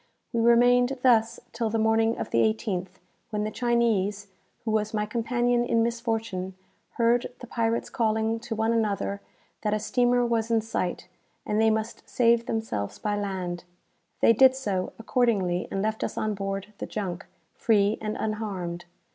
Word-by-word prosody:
We 230 - +1
remained 245 +2 +4
thus 230 -3 +4
till 230 -1 -1
the 225 - -1
morning 225 +1 +2
of - - -5
the 115 - +2
18th, 175 - 0 0.4
when 210 -2 -2
the 215 - -2
Chinese, 210 -4 0 0.4
who 220 - 0
was 215 0 0
my 210 0 0
companion 240 +2 +1
in 230 -1 +2
misfortune, 225 -5 -2 0.4
heard 235 +1 +2
the - - -8
pirates 230 -1 -1
calling 220 0 0
to 225 0 -5
one 220 +1 +1
another 200 -2 -1 0.4
that 210 -1 0
a - - -1
steamer 245 +3 +2
was 230 -1 0
in 225 -1 +3
sight 185 -5 -3 0.4
and 210 +1 +1
they 225 - +5
must 220 +1 -2
save 235 -1 +3
themselves 105 - -3
by 210 -1 -2
land. 185 -4 -3 0.6
They 230 - +6
did 260 +3 +6
so, 200 -8 -2
accordingly, 215 -7 +1
and 195 - -2
left 220 0 -1
us - - -4
on 215 0 0
board 195 +1 -4
the - - -4
junk, 190 -4 -4 0.3
free 210 -1 +2
and 215 0 -3
unharmed. 195 -6 -3
220 Hz, 165 wpm, -26 LUFS, 200-230 Hz, 0.6 s, They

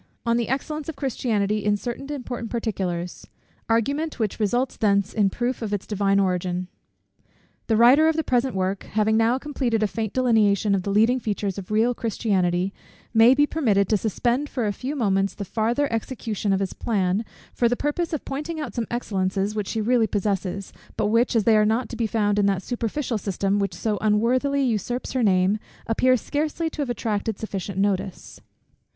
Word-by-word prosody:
_On 235 0 +2
the 235 -1 -1
Excellence 300 +4 -3
of 320 - -5
Christianity 215 -6 -1
in 210 0 +2
certain 245 +6 -5
important 245 -4 -5
Particulars. 185 -7 -3 0.4
Argument 280 +8 0
which 220 -3 -2
results 240 +5 0
thence 200 -2 +1
in 205 -3 +3
Proof 245 +5 -2
of 215 -2 -3
its 200 - -6
divine 200 -1 +1
Origin._ 180 -1 0 1.0
The 220 - +2
writer 260 +7 +6
of 320 - +2
the 320 - 0
present 250 -2 +1
work, 190 +1 -1
having 215 +1 0
now 225 +3 +3
completed 260 -6 -1
a - - +3
faint 220 0 -4
delineation 215 -5 +3
of 195 - +1
the 200 - -4
leading 225 +5 +3
features 205 -3 -2
of 185 - -10
real 225 +3 +2
Christianity, 195 -5 0 0.4
may 230 +3 +7
be 290 +1 +4
permitted 215 - +1
to 215 - +3
suspend 240 +7 0
for 245 -4 -2
a 205 - 0
few 260 +8 -4
moments 195 -6 +1
the 200 - -5
farther 235 +8 0
execution 225 -3 -2
of 195 0 +1
his 195 - -2
plan, 200 -2 0 0.3
for 235 - +2
the 245 - +1
purpose 325 +4 -1
of 310 - -3
pointing 300 +4 -4
out 300 - -5
some 235 -2 -2
excellences 195 -3 -1
which 210 -2 -3
she 220 - -2
really 230 0 +3
possesses; 200 -2 -2 0.2
but 205 - +1
which, 235 +3 +2
as 225 - +3
they 225 +1 +4
are 215 - +5
not 225 +2 +1
to - - -6
be 230 -1 0
found 210 -2 +1
in 200 - +3
that 195 -1 0
superficial 240 +1 -2
system 195 0 -1
which 200 0 -1
so 215 -2 -1
unworthily 250 +6 +2
usurps 245 +1 -1
her 255 - 0
name, 195 0 +3 0.3
appear 255 +3 +3
scarcely 310 +5 -2
to 305 - -5
have 275 - -2
attracted 220 -3 -2
sufficient 200 -3 -5
notice. 195 -1 -2
220 Hz, 190 wpm, -24 LUFS, 200-250 Hz, 1.0 s, may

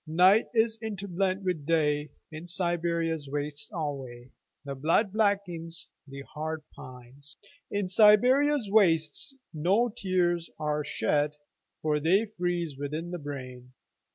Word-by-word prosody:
Night 185 +7 +5
is 225 0 +2
interblent 195 -3 -2
with 180 -5 -1
Day.In 155 +1 -1
Siberia's 170 -4 -1
wastes 145 +1 -3
alwayThe 135 - -7
blood 185 +6 +2
blackens, 180 -6 -1 0.2
the 135 0 -8
heart 155 +2 -5
pines.In 140 +10 -8
Siberia's 245 +7 +5
wastesNo 195 - +1
tears 175 -4 0
are 150 -1 -1
shed, 150 0 0 0.5
For 150 -1 +1
they 185 +8 +3
freeze 175 -6 -2
within 155 +4 -4
the 175 - -4
brain. 130 -4 -8
165 Hz, 100 wpm, -28 LUFS, 150-195 Hz, 0.5 s, Night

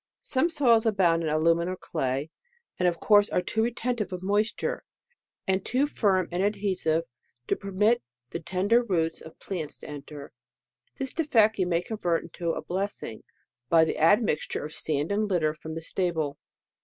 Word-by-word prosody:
Some 295 +4 +1
soils 240 -8 +3
abound 180 -6 +3
in 160 - -1
alumin 165 +2 +2
or 185 - -2
clay, 140 -3 -3 0.5
and 180 - +3
of 170 -1 0
course 205 -1 +5
are 180 - 0
too 220 - 0
retentive 235 -3 -1
of 180 0 -5
moisture, 205 +3 0 0.6
and 190 -2 0
too 260 +3 +1
firm 195 - +1
and 175 +1 -1
adhesive 190 -5 +1 0.4
to - - +1
permit 210 +4 +1 0.3
the 170 - -3
ten 185 +4 -2
der 235 +3 +5
roots 165 -8 -1
of 160 - -12
plants 170 -6 -5
to - - -11
enter. 145 -1 -9 0.7
^This 270 -1 -1
defect 225 -10 +3
you 185 - +2
may 170 0 +1
convert 175 -6 -1
into 170 0 -5
a'blessing, 185 - -4 0.5
by 165 -1 +6
the - - -3
admixture 165 -2 +2
of 155 - -7
sand 150 +2 0
and 210 +1 0
litter 160 -5 +1
from 160 0 -8
the 165 - -5
stable. 160 -5 -1
185 Hz, 170 wpm, -27 LUFS, 160-210 Hz, 0.7 s, by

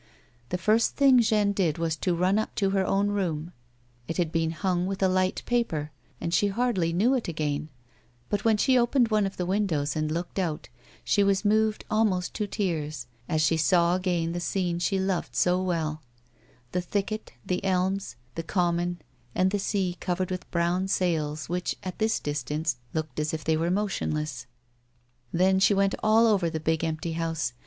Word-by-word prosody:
The 180 - -1
first 215 +5 +2
thing 270 -3 +6
Jeanne 215 -3 +3
did 180 -6 0
was 165 -1 -1
to 180 0 0
run 185 +4 +2
up 220 - -4
to 195 -2 +1
her 195 -1 +2
own 200 +2 +1
room. 175 -5 -2 0.5
It 165 - -3
had 170 -3 0
been 165 -1 +1
hung 180 +2 -1
with 195 0 -2
a - - +5
light 185 0 +1
paper 160 -12 -1 0.3
and 170 - -3
she 205 - +3
hardly 200 -5 0
knew 210 +10 +3
it 250 -6 -1
again, 150 -2 -2 0.6
but 205 - -1
when 225 -2 +4
she 255 +4 +4
opened 240 0 +3
one 215 -2 +2
of 195 - -8
the 180 - -1
windows 175 -7 0
and 155 0 -1
looked 170 +4 -3
out, 165 -5 -2 0.3
she 205 - +3
was 200 +1 +1
moved 215 +1 +2
almost 210 -5 +1
to 210 - -2
tears 155 - -2 0.2
as 155 -1 +2
she 160 +1 +3
saw 170 +2 +3
again 175 -3 0
the 175 - -3
scene 175 0 -1
she 190 +3 +1
loved 190 -2 -1
so 180 +1 +3
well 160 -4 -1 0.4
— 120 0 -33
the 180 - 0
thicket, 205 - -3
the 180 +1 -1
elms, 190 -6 0 0.2
the 165 - -3
common, 175 0 0 0.4
and 185 +1 +2
the 205 - 0
sea 190 -3 -1
covered 185 0 -2
with 185 -1 -5
brown 175 +2 0
sails 155 -6 0
which, 175 +1 -2
at 185 -1 -6
this 220 +1 +1
distance, 150 0 -2
looked 155 -3 -3
as 155 +1 -1
if 155 - -6
they 160 - +2
were 165 +2 0
motionless. 155 -9 -2 0.8
Then 190 +2 +3
she 200 +1 +4
went 195 0 +2
all 220 +2 +5
over 200 -6 +3
the 160 - -3
big, 160 +1 0
empty 160 +1 -2
house. 160 -6 -2
180 Hz, 190 wpm, -27 LUFS, 160-200 Hz, 0.8 s, thing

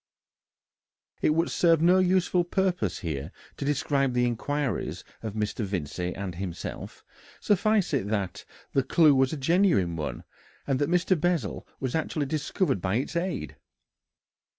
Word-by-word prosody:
It 150 - +3
would 165 +1 +1
serve 165 -2 +4
no 175 +3 +5
useful 180 -1 +3
purpose 185 +1 -1
here 75 -2 -4 0.3
to 140 - -4
describe 140 -2 +1
the 125 0 +2
inquiries 125 0 -2 0.2
of 110 -2 -5
Mr. 105 +1 -2
Vincey 90 -2 -3
and 95 -2 -4
himself; 90 -1 -6 0.3
suffice 205 -2 +2
it 125 -8 0
that 100 -4 -2 0.3
the 135 - +4
clue 150 +3 +5
was 130 -1 +3
a 155 - -3
genuine 145 - +2
one, 75 -2 -4 0.4
and 135 -2 0
that 145 - +1
Mr. 180 +2 +3
Bessel 170 - -1
was 130 -2 -2
actually 155 -2 -1
discovered 145 - -1
by 95 +2 0
its 135 +8 -2
aid. 180 +2 -2
140 Hz, 145 wpm, -27 LUFS, -, 0.4 s, no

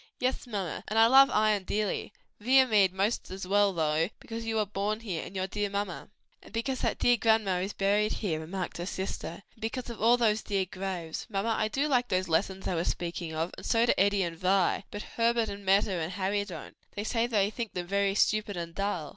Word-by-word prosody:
"Yes, 255 0 -1
mamma; 200 -7 -4
and 215 - -2
I 225 - +8
love 270 +3 +7
Ion 215 -2 +2
dearly: 210 +1 -2 0.3
Viamede 225 -5 +5
'most 195 +5 -1
as 190 0 -6
well, 200 +1 +3
though, 160 0 +1
because 225 0 -7
you 225 - -1
were 215 -1 +2
born 210 +2 -2
here, 185 -8 -4
and 195 - -10
your 185 0 -1
dear 205 +1 -2
mamma." 200 -2 -4 0.3
"And - - -15
because 250 +3 -2
that - - 0
dear 245 0 +4
grandma 220 -5 +2
is 195 +3 -3
buried 205 +2 +1
here;" 170 -8 -2
remarked 180 +3 -5
her 175 +1 -4
sister, 190 -1 -5
"and - - -25
because 235 +2 -4
of 230 - -9
all 235 +2 +5
those 220 -3 +2
dear 195 -2 -1
graves. 185 -3 -5
Mamma, 215 +2 0
I 215 - +1
do 270 +7 0
like 250 -4 +2
those 185 -2 0
lessons 190 +3 0
I - - 0
was 170 0 -1
speaking 170 -2 -3
of, 165 +3 -1
and - - -9
so 230 0 +3
do - - +4
Eddie 200 0 +3
and 170 -1 -3
Vi; 190 +1 +2
but 205 - -6
Herbert 230 -1 +1
and 200 0 -7
Meta 195 +1 +3
and 170 -1 -2
Harry 200 +2 -1
don't; 185 -4 -9 0.2
they 205 - -3
say 230 +1 0
they 210 -3 +1
think 230 -1 -5
them 180 -1 -3
very 200 +1 +1
stupid 210 -2 +1
and 170 -1 -5
dull." 180 -6 -2
200 Hz, 220 wpm, -29 LUFS, 185-220 Hz, 0.3 s, I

